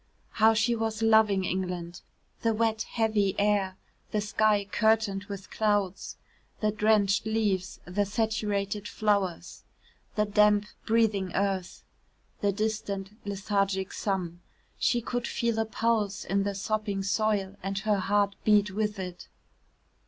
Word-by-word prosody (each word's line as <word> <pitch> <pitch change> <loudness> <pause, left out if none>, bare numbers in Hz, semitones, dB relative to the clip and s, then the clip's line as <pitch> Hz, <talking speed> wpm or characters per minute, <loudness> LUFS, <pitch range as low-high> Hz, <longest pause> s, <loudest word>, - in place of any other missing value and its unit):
How 220 +1 +4
she 225 +2 +2
was 225 -1 -2
loving 220 -3 +4
England! 180 -1 -3 0.4
The 225 -1 +1
wet, 220 0 +1
heavy 215 -4 +1
air 200 -2 +1 0.3
the 210 - 0
sky 210 0 +2
curtained 210 -1 +1
with 200 -2 -8
clouds 205 -3 0 0.4
the 215 -1 +1
drenched 210 -1 +2
leaves 210 -4 -1
the 200 +3 0
saturated 210 -1 -1
flowers 200 -6 -1 0.5
the 210 - +2
damp 210 0 +4 0.2
breathing 215 -5 +2
earth 195 -2 -1 0.6
the 205 - +2
distant 205 -2 -3 0.2
lethargic 195 -1 -1
sun. 180 -4 -2 0.4
She 240 - +2
could 245 +1 -3
feel 230 -1 -1
a 225 - +1
pulse 220 -2 0
in 195 0 0
the 200 -1 -2
sopping 205 0 -2
soil 200 -1 0
and 195 +1 -3
her 205 +1 +1
heart 200 +1 +1
beat 210 -2 +4
with 210 +1 -1
it. 180 -2 -7
205 Hz, 130 wpm, -28 LUFS, 195-220 Hz, 0.6 s, How